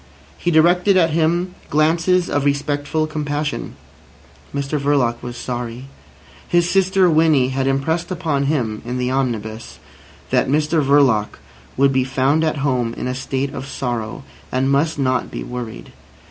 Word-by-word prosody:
He 175 Hz, -, -2 dB
directed 175 Hz, +4 st, +4 dB
at 165 Hz, -3 st, +3 dB
him 170 Hz, +3 st, +1 dB, 0.2 s
glances 165 Hz, +4 st, +2 dB
of 145 Hz, -, 0 dB
respectful 145 Hz, +2 st, 0 dB
compassion. 150 Hz, -1 st, -3 dB, 0.8 s
Mr 140 Hz, +1 st, -2 dB
Verloc 135 Hz, -5 st, +1 dB
was 120 Hz, 0 st, -7 dB
sorry. 120 Hz, 0 st, -5 dB, 0.6 s
His 175 Hz, 0 st, +2 dB
sister 190 Hz, 0 st, +3 dB
Winnie 155 Hz, -5 st, +3 dB
had 135 Hz, 0 st, -1 dB
impressed 140 Hz, +5 st, 0 dB
upon 160 Hz, -6 st, -1 dB
him 120 Hz, -8 st, -1 dB
(in 125 Hz, +2 st, -4 dB
the 125 Hz, 0 st, -1 dB
omnibus) 115 Hz, -4 st, -3 dB, 0.5 s
that -, -, +2 dB
Mr 150 Hz, +2 st, +2 dB
Verloc 135 Hz, -7 st, +3 dB, 0.4 s
would 135 Hz, +1 st, +4 dB
be 130 Hz, -1 st, +2 dB
found 135 Hz, +4 st, +1 dB
at 155 Hz, -1 st, 0 dB
home 125 Hz, -4 st, 0 dB
in -, -, -4 dB
a 125 Hz, -, -1 dB
state 135 Hz, +1 st, -3 dB
of 135 Hz, -, -6 dB
sorrow, 120 Hz, -2 st, -4 dB, 0.3 s
and 130 Hz, +1 st, +1 dB
must 150 Hz, +3 st, +1 dB
not 130 Hz, -2 st, 0 dB
be -, -, -6 dB
worried. 125 Hz, -3 st, -7 dB
140 Hz, 145 wpm, -20 LUFS, 130-160 Hz, 0.8 s, directed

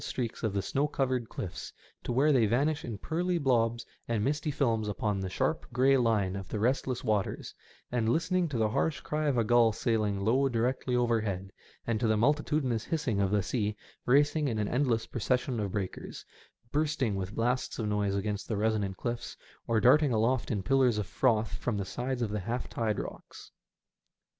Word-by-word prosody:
215 125 Hz, -, -2 dB
streaks 115 Hz, -, -8 dB
of 110 Hz, -, +1 dB
the 100 Hz, -1 st, -1 dB
snow 140 Hz, +7 st, 0 dB
covered 130 Hz, -5 st, -1 dB
cliffs 90 Hz, -, -6 dB, 0.3 s
to -, -, -3 dB
where 140 Hz, +5 st, +3 dB
they 120 Hz, -6 st, +4 dB
vanish 145 Hz, +7 st, +1 dB
in 115 Hz, -4 st, -5 dB
pearly 175 Hz, -, -1 dB
blobs 120 Hz, -5 st, +1 dB, 0.2 s
and 115 Hz, -3 st, 0 dB
misty 150 Hz, +4 st, 0 dB
films 115 Hz, -7 st, 0 dB
upon 105 Hz, 0 st, -1 dB
the 95 Hz, -1 st, -3 dB
sharp, 155 Hz, -, -1 dB
grey 130 Hz, +3 st, +4 dB
line 110 Hz, -7 st, +2 dB
of 95 Hz, -2 st, -6 dB
the -, -, -3 dB
restless 125 Hz, +2 st, 0 dB
waters, 105 Hz, -5 st, -1 dB, 0.4 s
and 115 Hz, -2 st, +1 dB
listening 170 Hz, +5 st, +1 dB
to 135 Hz, -, -2 dB
the 110 Hz, -1 st, +2 dB
harsh 150 Hz, +7 st, 0 dB
cry 155 Hz, 0 st, -2 dB
of 140 Hz, -4 st, +1 dB
a 115 Hz, -, +3 dB
gull 115 Hz, 0 st, +4 dB
sailing 105 Hz, -3 st, 0 dB
low 125 Hz, +7 st, +2 dB
directly 125 Hz, +1 st, 0 dB
overhead, 110 Hz, -6 st, 0 dB, 0.3 s
and 115 Hz, -2 st, 0 dB
to 115 Hz, -, +1 dB
the 110 Hz, 0 st, +2 dB
multitudinous 140 Hz, -2 st, +1 dB
hissing 150 Hz, -, -1 dB
of 95 Hz, -, +2 dB
the 105 Hz, -1 st, +1 dB
sea 105 Hz, -1 st, -1 dB, 0.3 s
racing 145 Hz, +3 st, +3 dB
in 115 Hz, -4 st, -1 dB
an 105 Hz, -1 st, 0 dB
endless 120 Hz, -3 st, +1 dB
procession 125 Hz, +1 st, -1 dB
of 100 Hz, -3 st, -3 dB
breakers, 100 Hz, -3 st, -5 dB, 0.5 s
bursting 145 Hz, -7 st, 0 dB
with 95 Hz, +2 st, -4 dB
blasts 125 Hz, +2 st, 0 dB
of 110 Hz, -, -2 dB
noise 105 Hz, -1 st, 0 dB
against 100 Hz, 0 st, -2 dB
the 110 Hz, -, -2 dB
resonant 105 Hz, -3 st, 0 dB
cliffs, 120 Hz, -1 st, -4 dB, 0.3 s
or 115 Hz, -1 st, +2 dB
darting 135 Hz, +6 st, +5 dB
aloft 115 Hz, +2 st, +1 dB
in 100 Hz, -5 st, -1 dB
pillars 130 Hz, -1 st, +3 dB
of 105 Hz, -, -1 dB
froth 110 Hz, 0 st, +1 dB
from 115 Hz, -4 st, -2 dB
the 100 Hz, -, -2 dB
sides 125 Hz, +4 st, -3 dB
of 105 Hz, -, -2 dB
the 105 Hz, -, -1 dB
half 115 Hz, +6 st, -3 dB
tide 110 Hz, -3 st, -1 dB
rocks. -, -, -8 dB
115 Hz, 190 wpm, -30 LUFS, 105-135 Hz, 0.5 s, darting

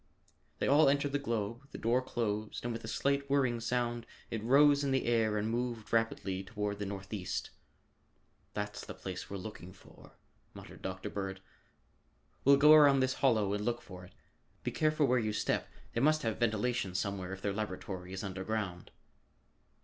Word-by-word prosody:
They -, -, -1 dB
all 145 Hz, +1 st, +6 dB
entered 140 Hz, 0 st, +1 dB
the 145 Hz, -, 0 dB
globe, 115 Hz, 0 st, -3 dB
the -, -, -8 dB
door 120 Hz, +3 st, +2 dB
closed 110 Hz, -4 st, -3 dB
and 120 Hz, -, -1 dB
with 115 Hz, -, -6 dB
a -, -, -6 dB
slight 140 Hz, +4 st, 0 dB
whirring 130 Hz, -4 st, +2 dB
sound 120 Hz, 0 st, -1 dB, 0.2 s
it 115 Hz, -2 st, -3 dB
rose 140 Hz, +4 st, +5 dB
in 140 Hz, -, 0 dB
the 135 Hz, 0 st, +1 dB
air 115 Hz, -2 st, +2 dB
and 105 Hz, +1 st, 0 dB
moved 120 Hz, -1 st, -3 dB
rapidly 105 Hz, -4 st, 0 dB
toward 105 Hz, 0 st, -3 dB
the 105 Hz, -, -3 dB
northeast. 95 Hz, -1 st, -4 dB, 1.0 s
"That's 105 Hz, 0 st, -4 dB
the -, -, -8 dB
place 95 Hz, -1 st, -6 dB
we're 100 Hz, -, -4 dB
looking 95 Hz, -2 st, -8 dB
for," 95 Hz, -, -17 dB, 0.4 s
muttered -, -, -11 dB
Dr. 95 Hz, 0 st, -5 dB
Bird. 95 Hz, -1 st, -4 dB, 1.0 s
"We'll 140 Hz, +1 st, +7 dB
go 150 Hz, +2 st, +8 dB
around 145 Hz, -3 st, +7 dB
this 130 Hz, 0 st, +2 dB
hollow 110 Hz, -7 st, +3 dB
and 105 Hz, 0 st, -2 dB
look 120 Hz, +1 st, 0 dB
for 90 Hz, -1 st, -11 dB
it. 90 Hz, -, -14 dB, 0.5 s
Be -, -, -1 dB
careful 155 Hz, -1 st, +2 dB
where 125 Hz, -1 st, +3 dB
you 110 Hz, -2 st, -1 dB
step; -, -, -1 dB, 0.2 s
they 115 Hz, -, 0 dB
must 155 Hz, +2 st, +3 dB
have 110 Hz, -2 st, -1 dB
ventilation 110 Hz, -3 st, 0 dB
somewhere 95 Hz, -1 st, -2 dB
if 95 Hz, 0 st, -7 dB
their 100 Hz, -, 0 dB
laboratory 95 Hz, -3 st, -5 dB
is 95 Hz, +1 st, -5 dB
underground." 95 Hz, -1 st, -3 dB
110 Hz, 175 wpm, -32 LUFS, 100-130 Hz, 1.0 s, go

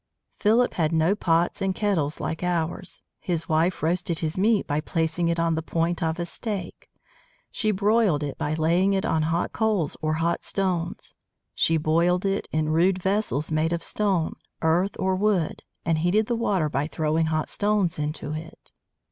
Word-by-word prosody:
Philip 230 Hz, +4 st, +2 dB
had 160 Hz, -2 st, 0 dB
no 165 Hz, +3 st, +3 dB
pots 170 Hz, -1 st, +1 dB
and 190 Hz, -1 st, 0 dB
kettles 170 Hz, -9 st, 0 dB
like 160 Hz, -, -3 dB
ours. 175 Hz, +1 st, -2 dB, 0.2 s
His 170 Hz, -3 st, -2 dB
wife 165 Hz, +3 st, +1 dB
roasted 170 Hz, 0 st, 0 dB
his 160 Hz, 0 st, -2 dB
meat 210 Hz, +2 st, +2 dB
by 145 Hz, +1 st, -1 dB
placing 165 Hz, +1 st, -1 dB
it 170 Hz, 0 st, 0 dB
on 165 Hz, 0 st, +2 dB
the 160 Hz, -, -1 dB
point 165 Hz, +2 st, -1 dB
of 160 Hz, 0 st, 0 dB
a 175 Hz, -, -2 dB
stake. 195 Hz, -1 st, -5 dB, 0.6 s
She 215 Hz, -, 0 dB
broiled 205 Hz, -5 st, +2 dB
it 140 Hz, -2 st, -3 dB
by 150 Hz, +1 st, -2 dB
laying 170 Hz, +5 st, +2 dB
it 195 Hz, 0 st, 0 dB
on 160 Hz, -, +1 dB
hot 165 Hz, +2 st, -1 dB
coals 210 Hz, -9 st, 0 dB
or 155 Hz, 0 st, 0 dB
hot 165 Hz, +2 st, 0 dB
stones. 180 Hz, -3 st, -2 dB, 0.4 s
She 165 Hz, -, +2 dB
boiled 170 Hz, +4 st, +2 dB
it 195 Hz, +1 st, 0 dB
in 155 Hz, 0 st, 0 dB
rude 175 Hz, +4 st, +3 dB
vessels 190 Hz, -5 st, -1 dB
made 155 Hz, +2 st, +1 dB
of 170 Hz, -1 st, -2 dB
stone, 195 Hz, -6 st, 0 dB, 0.3 s
earth, 175 Hz, +5 st, +2 dB
or 190 Hz, 0 st, +1 dB
wood, 190 Hz, -4 st, 0 dB, 0.2 s
and 165 Hz, -2 st, +1 dB
heated 185 Hz, +7 st, +2 dB
the 235 Hz, -, -1 dB
water 200 Hz, -8 st, +1 dB
by 145 Hz, 0 st, -1 dB
throwing 160 Hz, +1 st, 0 dB
hot 155 Hz, -1 st, 0 dB
stones 205 Hz, -5 st, 0 dB
into 150 Hz, 0 st, -3 dB
it. 160 Hz, +1 st, -9 dB
170 Hz, 175 wpm, -25 LUFS, 160-195 Hz, 0.6 s, no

